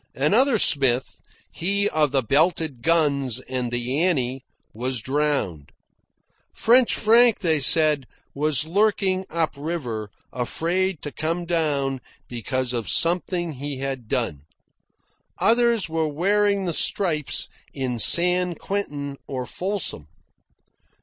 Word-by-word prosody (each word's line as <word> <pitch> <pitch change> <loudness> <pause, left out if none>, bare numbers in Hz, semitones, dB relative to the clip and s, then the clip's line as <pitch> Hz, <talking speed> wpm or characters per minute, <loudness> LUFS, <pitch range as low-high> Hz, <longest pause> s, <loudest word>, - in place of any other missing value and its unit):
Another 225 - +3
Smith, 135 - +1 0.3
he 200 +4 0
of 155 -5 +1
the 135 -2 +1
belted 155 0 +1
guns 140 -5 +1
and 125 -2 -4
the 125 +4 -1
Annie, 135 -7 0 0.3
was 125 +2 -3
drowned. 135 - -2 0.8
French 245 +1 +4
Frank, 230 +1 +4
they 160 -5 +2
said, 150 -2 +3 0.3
was 150 0 +1
lurking 190 +1 0
up 165 -1 -1
river, 140 -9 -5 0.2
afraid 170 +8 -2
to 145 - -5
come 165 +4 -3
down 145 -6 -1 0.3
because 125 +1 -2
of 120 -3 -3
something 175 0 +2
he 140 0 -6
had 135 -3 -5
done. 70 -8 -2 1.0
Others 235 -2 +3
were 160 -1 -1
wearing 200 +5 +1
the 170 - -1
stripes 155 -5 0 0.2
in 130 -4 -4
San 180 - +4
Quentin 145 -10 -4
or 130 -2 -4
Folsom. 180 - -2
155 Hz, 115 wpm, -23 LUFS, 130-180 Hz, 1.0 s, French